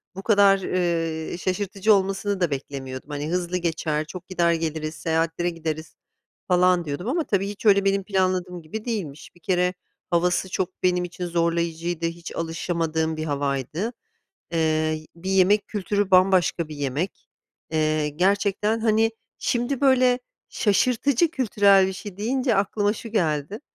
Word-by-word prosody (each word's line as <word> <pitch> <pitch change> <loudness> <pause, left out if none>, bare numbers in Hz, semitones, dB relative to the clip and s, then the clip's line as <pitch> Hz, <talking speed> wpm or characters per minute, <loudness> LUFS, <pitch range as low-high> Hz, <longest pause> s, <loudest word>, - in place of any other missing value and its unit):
bu 195 - -7
kadar, 200 -2 +5
ııı, 165 -3 -1
şaşırtıcı 195 +3 +1
olmasını 195 0 0
da 175 -4 +1
beklemiyordum. 135 -1 -6
Hani 145 +1 -4
hızlı 180 0 -1
geçer, 160 -3 -1
çok 180 +3 -9
gider 170 -2 +2
geliriz 160 -1 -3
seyahatlere 165 +2 0
gideriz 160 -2 -5 0.5
falan 180 -1 +3
diyordum 145 +7 -4
ama, 320 +6 +1
tabii, 200 -7 0
hiç 205 +2 -8
öyle 200 -1 +5
benim 195 0 +2
planladığım 185 -2 -1
gibi 210 +9 -7
değilmiş. 175 - -5
Bir - - -20
kere 180 -3 +1 0.4
havası 180 +2 +1
çok 185 -1 -3
benim 180 -1 +2
için 180 +1 -5
zorlayıcıydı, 170 0 -1
hiç 170 0 -5
alışamadığım 165 -1 -1
bir 155 - -3
havaydı. 145 - -2 0.6
Iıı, 155 -1 +1 0.2
bir 185 +3 -5
yemek 195 +2 +3
kültürü 205 -1 -1
bambaşka 185 -3 +4
bir 155 - -8
yemek. 145 +6 -3 0.4
Eee 155 -1 +1
gerçekten, 200 +6 +1
hani, 220 0 +3 0.3
şimdi, 245 +2 -1
böyle, 255 -2 +4 0.3
şaşırtıcı 250 - +2
kültürel 200 - +4
bir 190 - -3
şey 195 0 -8
deyince 245 +3 0
aklıma 205 +1 +1
şu 230 +1 -8
geldi. 170 -2 -1
180 Hz, 140 wpm, -24 LUFS, 160-200 Hz, 0.6 s, kadar